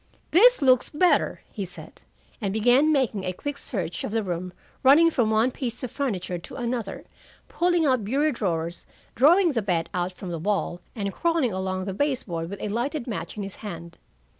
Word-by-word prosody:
"This 470 - +6
looks 255 -2 +4
better," 350 +4 +2
he 205 - -4
said, 180 -1 -10 0.4
and 200 -3 -1
began 245 +8 +4
making 255 -9 +1
a 185 -1 -2
quick 285 +8 -5
search 175 -7 -3
of - - -3
the 225 0 0
room, 180 -1 -4 0.3
running 310 +5 +6
from 240 -7 +1
one 220 +4 +3
piece 245 -1 -4
of 250 - -4
furniture 195 -10 -2
to - - -11
another, 235 -5 -3 0.4
pulling 350 -2 +1
out 255 -5 +2
bureau 280 +9 +1
drawers, 170 - -3 0.3
drawing 340 +7 +5
the 235 -5 0
bed 175 -5 -1
out 180 0 -1
from 180 -1 -8
the 165 - -3
wall, 185 -1 -1
and 200 -3 -3
crawling 330 - +1
along 185 0 -2
the 195 - -3
base 270 +4 0
board 165 -3 -4
with 200 0 -7
a 210 - -2
lighted 240 +5 -2
match 190 -6 -5
in 205 - -3
his 195 -1 -8
hand. 170 -5 -8
220 Hz, 190 wpm, -25 LUFS, 185-275 Hz, 0.4 s, This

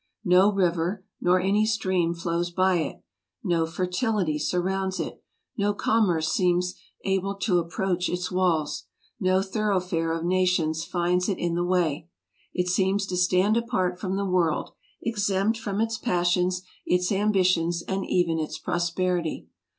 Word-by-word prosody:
No 185 +3 +5
river 185 0 0 0.2
nor 180 +1 +4
any 195 +3 +2
stream 185 -6 +1
flows 170 +1 -1
by 185 +1 +2
it; 155 -4 -4 0.4
no 165 -2 +1
fertility 180 -1 -1
surrounds 190 +3 -1
it; 160 - -5 0.4
no 205 0 +1
commerce 180 -9 +2
seems 180 0 +1 0.3
able 195 +1 0
to 195 -3 +1
approach 180 +1 -1
its 180 +1 -3
walls; 175 -5 0 0.3
no 185 -1 +2
thoroughfare 185 -5 -1
of 165 0 -2
nations 175 -3 +1
finds 180 +2 0
it 195 - 0
in 175 -1 -1
the 175 +1 0
way. 175 -3 0 0.4
It 180 0 -1
seems 190 +2 +1
to 185 - -4
stand 185 +4 +3
apart 185 -7 -1
from 190 -1 -2
the 200 0 -1
world, 180 -4 +1 0.3
exempt 210 0 0
from 205 -2 -3
its 225 0 0
passions, 180 -3 +1 0.2
its 180 +1 +1
ambitions, 185 -4 +2
and 195 0 -2
even 170 -3 +1
its 155 0 -3
prosperity. 175 0 -1
180 Hz, 145 wpm, -26 LUFS, 175-195 Hz, 0.4 s, No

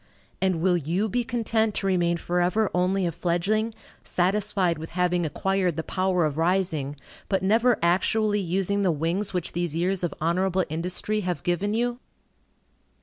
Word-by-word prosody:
And 185 -4 +1
will 180 0 +3
you 175 +7 -1
be 245 +3 0
content 225 -2 0
to - - -2
remain 175 -3 +2
forever 180 +5 0
only 185 +1 +1
a 170 - 0
fledgling, 205 +7 0 0.3
satisfied 185 -2 +1
with 160 - -7
having 180 -2 +1
acquired 190 +1 0
the 160 - -3
power 185 -2 +1
of 150 0 -2
rising, 165 -5 0 0.3
but 190 -2 +1
never 225 +4 +3
actually 205 +4 +2
using 195 +3 0
the 190 - +2
wings 165 +6 -1
which 180 -2 -2
these 175 -2 -2
years 180 +2 0
of 175 - 0
honorable 185 +3 +1
industry 180 +6 -2
have 180 -7 -3
given 195 +4 0
you? 240 +1 -1
185 Hz, 155 wpm, -25 LUFS, 170-205 Hz, 0.3 s, will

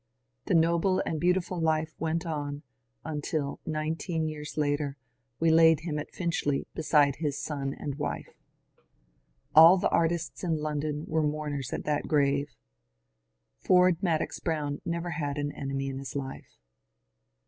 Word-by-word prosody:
The - - +1
noble 170 +3 +3
and 155 - -2
beauti 180 +1 +3
ful 180 0 -5
life 155 -1 +1
went 165 +1 -1
on 145 -2 -4 0.4
until, 150 -1 -3
nineteen 160 +1 -2
years 150 -1 -6
later, 145 -1 0 0.4
we 165 0 +4
laid 160 -1 +6
him 155 -3 -3
at - - -6
Finchley 165 -5 -1
beside 150 -3 +3
his 145 -2 -2
son 140 -3 -3
and 145 0 -5
wife. 145 - -4 1.2
All 165 +4 +9
the - - +1
artists 170 +1 0
in 165 -3 +1
London 150 0 -2
were 160 0 +1
mourners 150 -3 -2
at - - -3
that 150 -1 -1
grave. 140 -3 +1 1.0
Ford 180 -2 +4
Madox 165 -4 0
Brown 150 -3 -2
never 170 0 -2
had 145 -4 -3
an 145 0 -2
enemy 135 -1 -3
in 135 0 -5
his 135 0 -7
life. 135 -1 -6
155 Hz, 145 wpm, -28 LUFS, 145-165 Hz, 1.2 s, All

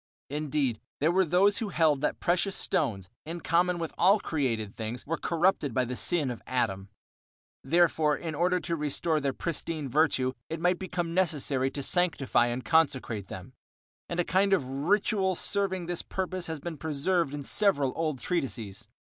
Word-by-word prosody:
Indeed, 145 -5 -1 0.2
there 155 +4 +3
were 190 +1 +3
those 200 +5 +4
who 225 -4 -2
held 155 -6 +2
that - - -1
precious 180 +3 +1
stones, 100 - -1
in 165 +2 -6
common 175 +2 +2
with 165 -2 -4
all 195 +4 +5
created 115 - -2
things, 115 +2 -5
were 165 - -1
corrupted 165 -7 +1
by 130 - +2
the 125 +1 -4
sin 150 -2 0
of 120 - -7
Adam. 100 -6 -1 0.7
Therefore, 160 -3 +3
in 160 -2 -5
order 180 +4 +1
to 170 - -1
restore 155 +1 0
their 140 -1 0
pristine 160 0 -4
virtue 130 -2 +2 0.2
it 165 - -4
might 175 +1 +2
become 175 -3 -3
necessary 145 -7 +1
to 140 +1 -5
sanctify 145 -8 +2
and 120 +1 -3
consecrate 130 - +1
them, 95 +9 -9 0.6
and 175 - -3
a - - +4
kind 195 +2 +2
of 180 -9 +2
ritual 190 - +1
serving 190 -1 0
this 175 0 -2
purpose 185 -1 -4
has 160 -2 -4
been 165 +1 -6
preserved 155 +1 0
in 145 - -5
several 145 -7 +2
old 155 -4 -1
treatises. 125 - -3
160 Hz, 170 wpm, -28 LUFS, 135-180 Hz, 0.7 s, all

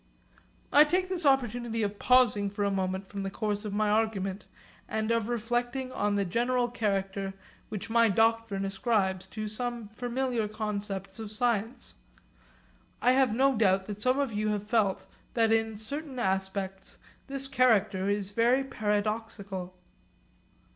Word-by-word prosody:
I 290 - +9
take 365 +4 0
this 355 -5 0
opportunity 240 -4 +1
of 205 0 -3
pausing 240 -6 +4
for 205 +1 -3
a 200 - +1
moment 190 0 -2
from 200 0 -6
the 195 - -2
course 210 +1 -2
of 210 - -3
my 215 0 +2
argument, 210 -2 0 0.4
and 220 +1 -1
of 230 -1 +1
reflecting 240 +3 -1
on 205 -4 0
the 200 -1 +1
general 240 +5 +1
character 195 -4 -2 0.3
which 210 0 -5
my 230 0 +5
doctrine 225 -1 +2
ascribes 195 -2 0
to 215 0 -5
some 235 0 -4
familiar 245 0 -2
concepts 210 -1 -4
of 215 -2 -6
science. 230 +1 -1 1.1
I 250 - +4
have 255 -4 +3
no 270 +2 +4
doubt 190 -3 +3
that 210 0 -6
some 255 +3 +2
of 275 -5 0
you 210 +1 -1
have 210 -1 -1
felt 210 -3 +1 0.3
that 225 -2 +3
in 225 -1 +1
certain 280 +5 -6
aspects 190 -2 -2 0.3
this 275 0 -4
character 215 -7 +3
is 205 -1 -1
very 240 +5 +3
paradoxical. 210 -5 -3
215 Hz, 145 wpm, -29 LUFS, 200-240 Hz, 1.1 s, I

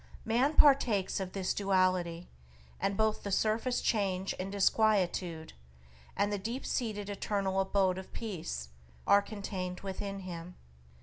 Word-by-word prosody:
Man 250 +7 +2
partakes 245 -11 +4
of 185 -1 -5
this 190 -2 -1
duality, 185 -3 +1 0.5
and 200 0 -1
both 220 0 +1
the 200 - -4
surface 225 +5 +1
change 195 -3 0
and 190 +1 -3
disquietude, 190 -5 +1 0.6
and 205 0 +1
the 205 - -1
deep 230 +7 -4
seated 215 -5 -2
eternal 200 -1 -1
abode 190 -1 +2
of 190 - -10
Peace, 160 - -5 0.4
are 200 - +6
contained 195 -3 -5
within 195 0 -5
him. 175 -1 -7
195 Hz, 130 wpm, -32 LUFS, 185-215 Hz, 0.6 s, are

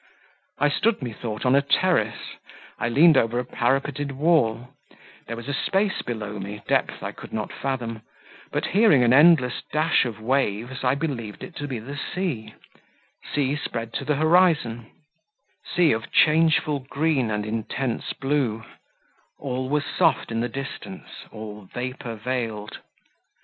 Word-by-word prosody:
I 145 +1 +3
stood, 210 - +1
methought, 115 -2 -5
on 125 - +4
a 140 - +5
terrace; 175 +6 +2 0.6
I 120 - 0
leaned 150 +4 +6
over 115 -1 +2
a 125 - -1
parapeted 135 +3 -1
wall; 130 -6 +2 0.6
there 115 - -4
was 120 +5 -4
space 195 +5 0
below 105 -3 -5
me, 100 +2 -7
depth - - 0
I - - -3
could - - -12
not 110 -1 -4
fathom, 120 -5 -3 0.5
but - - -1
hearing 200 - +5
an 120 0 +4
endless 140 -4 +5
dash 155 -2 +3
of 110 -4 -5
waves, 125 0 -1
I 130 +1 +3
believed 130 -9 -4
it 180 - -9
to 145 - -4
be 130 -4 -3
the 140 +6 -7 0.2
sea; 130 - -3 0.8
sea 140 -1 +1
spread 115 -6 -5
to - - -3
the 150 - +1
horizon; 155 -8 +3 0.8
sea 175 -4 +4
of 115 0 -2
changeful 155 -2 +4
green 140 -1 0
and 105 -1 -2
intense 115 +3 -3
blue: 135 -6 -1 0.7
all 130 -1 -3
was 150 +1 +1
soft - - +1
in 115 - -1
the 120 +1 -1
distance; 140 +7 -7 0.2
all 105 -2 -8
vapour 125 -1 -5
veiled. 110 -2 -4
130 Hz, 145 wpm, -24 LUFS, 115-150 Hz, 0.8 s, leaned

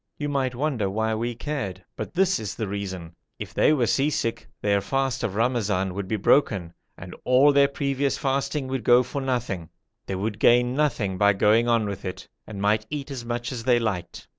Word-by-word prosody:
You 145 0 -3
might 135 -3 -1
wonder 125 -7 -1
why 110 +3 -1
we 120 +2 -2
cared, 105 - -4
but - - -6
this 190 +1 +2
is 105 - -5
the 110 - -3
reason. 95 -4 -5 0.2
If - - -7
they - - +4
were 135 -6 +2
sea 140 +5 +2
sick 115 -6 -2
their 100 -1 +1
fast 135 +4 -1
of 100 - -2
Ramazan 105 -5 0
would 100 0 -4
be 110 - -1
broken, 95 - +2 0.2
and 90 -1 -9
all 135 +3 +5
their 140 0 +5
previous 140 0 -1
fasting 135 0 -1
would 130 -3 -2
go 120 +3 +6
for 140 +3 -5
nothing; 120 -10 -2 0.4
they 95 - -2
would 105 +2 -3
gain 125 +1 +4
nothing 120 -10 0
by 100 0 +5
going 105 +4 +3
on 115 -2 +2
with 100 -1 -5
it, 95 - -6 0.2
and 105 -2 -7
might 105 +2 +1
eat 145 -1 -5
as 130 -3 -5
much 120 +1 -3
as 120 -3 -5
they 125 -2 +4
liked. 95 -7 -3
115 Hz, 205 wpm, -25 LUFS, 100-135 Hz, 0.4 s, go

